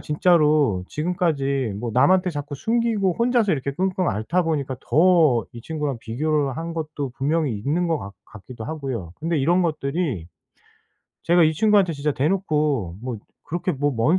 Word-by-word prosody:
진짜로 150 - +2
지금까지 140 - -1
뭐 120 +2 -4
남한테 180 - +4
자꾸 145 -2 -5
숨기고 220 - 0
혼자서 235 -3 +2
이렇게 140 -2 -2
끙끙 185 +3 0
앓다 110 - 0
보니까 145 -5 -2
더 155 - +4
이 120 - -9
친구랑 150 -3 -3
비교를 140 +3 -1
한 165 +1 -4
것도 155 -4 -4
분명히 150 0 0
있는 155 +11 0
것 165 -2 0
같 100 0 -8
같기도 110 +2 -10
하고요. 130 - -5
근데 165 0 0
이런 175 +7 +3
것들이 150 - -2 1.0
제가 175 +1 +4
이 155 - +3
친구한테 200 +1 +3
진짜 145 +1 -1
대놓고 150 - 0
뭐 125 -2 -4 0.3
그렇게 175 +2 -2
뭐 145 +1 0
먼 120 +11 +2
150 Hz, 330 characters per minute, -23 LUFS, 130-175 Hz, 1.0 s, 남한테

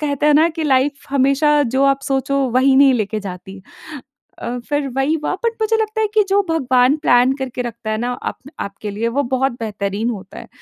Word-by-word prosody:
कहते 290 -1 -1
हैं 300 - +5
ना 315 +3 +5
कि 320 -1 -5
लाइफ 275 0 +2
हमेशा 275 +2 +2 0.3
जो 270 - +2
आप 275 0 +2
सोचो 275 0 -1
वही 260 +2 +3
नहीं 275 -1 +6
लेके 215 -2 -2
जाती। 190 0 -8 0.8
अ, 245 +1 -4
फिर 290 -1 -1
वही 270 +4 +1
हुआ - - 0
बट 460 -1 0
मुझे 450 +1 +2
लगता 435 0 -3
है 435 - +3
कि 425 -2 +4
जो 395 +1 +3
भगवान 260 -3 +3
प्लान 245 -2 +4
करके 255 -2 -4
रखता 235 -2 -6
है 215 - -1
ना, 245 +2 -2
आप - - -5 0.2
आपके 200 +1 -6
लिए, 215 +3 -2
वो 270 +5 0
बहुत 265 +1 +1
बेहतरीन 210 +1 -2
होता 195 -4 -8
है - - -11
265 Hz, 210 wpm, -18 LUFS, 230-290 Hz, 0.8 s, नहीं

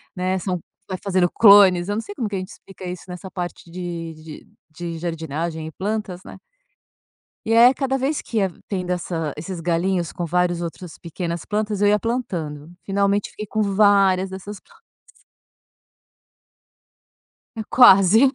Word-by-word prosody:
né, 185 +1 -1
são 180 -1 -2 0.3
vai 185 - -3
fazendo 185 -3 +1
clones, 200 -4 +7
eu 205 - -1
não 220 - -1
sei 210 -2 -9
como 225 +1 -3
que 205 - -4
a - - -1
gente 185 +2 -7
explica 190 -1 -14
isso 180 0 -6
nessa 180 +1 -8
parte 175 -2 -6
de 170 -2 -5
de 155 -1 -12 0.2
de 165 +1 -6
jardinagem 160 -1 -4
e 160 - -8
plantas, 200 -1 -4
né. - - -10 1.1
E 225 - +1
aí 235 +2 +8
a 260 - +1
cada 270 0 -1
vez 275 +3 -1
que 230 - -5
ia 195 -3 +1 0.2
tendo 180 -3 -3
essa 165 -4 -3
esses 175 +2 -6
galhinhos 175 0 0
com 175 - -4
vários 175 0 0
outros 170 0 -7
pequenas 170 0 -5
plantas, 210 -1 -2
eu 205 - +4
ia 210 0 +3
plantando. 170 - -4
Finalmente 200 +1 0
fiquei 215 - -7
com 215 +1 -2
várias 195 -2 +3
dessas 195 +2 -8
plan - - -24 2.8
É 225 - -4
quase. 220 +2 +7
185 Hz, 165 wpm, -22 LUFS, 175-205 Hz, 2.8 s, aí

